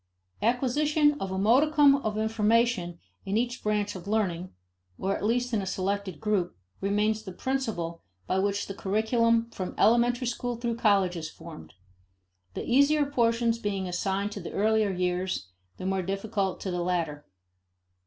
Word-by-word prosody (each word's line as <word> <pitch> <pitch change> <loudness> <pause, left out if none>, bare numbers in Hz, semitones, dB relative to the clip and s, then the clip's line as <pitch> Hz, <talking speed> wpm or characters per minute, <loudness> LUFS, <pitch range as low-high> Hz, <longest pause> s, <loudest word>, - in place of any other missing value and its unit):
Acquisition 295 +6 +2
of 195 - -3
a 190 - -3
modicum 280 +7 +5
of 215 -6 -3
information 220 -4 +1 0.3
in 195 +2 -1
each 245 +2 -1
branch 210 -1 -1
of 185 +1 -9
learning, 185 -4 -1 0.5
or 195 +1 -1
at - - -6
least 245 +3 0
in 215 - +2
a - - -4
selected 190 -2 -2
group, 195 - -1 0.2
remains 210 +2 +1
the 190 - -8
principle 205 -8 -3 0.2
by 190 - 0
which 200 +1 0
the 195 - -6
curriculum, 230 +4 +1
from 185 -1 -5
elementary 240 +3 +3
school 245 0 -2
through 235 0 -2
college, 200 -5 +3
is 160 -2 -5
formed; 155 - -12 0.8
the - - -4
easier 285 +4 +4
portions 230 -3 +1
being 200 -3 -2
assigned 195 +3 -1
to 205 - -6
the 170 - -7
earlier 215 0 +2
years, 180 - -2 0.3
the - - -7
more 190 0 0
difficult 195 0 -2
to 190 - -3
the 180 0 -2
later. 165 -5 -2
210 Hz, 155 wpm, -28 LUFS, 190-235 Hz, 0.8 s, modicum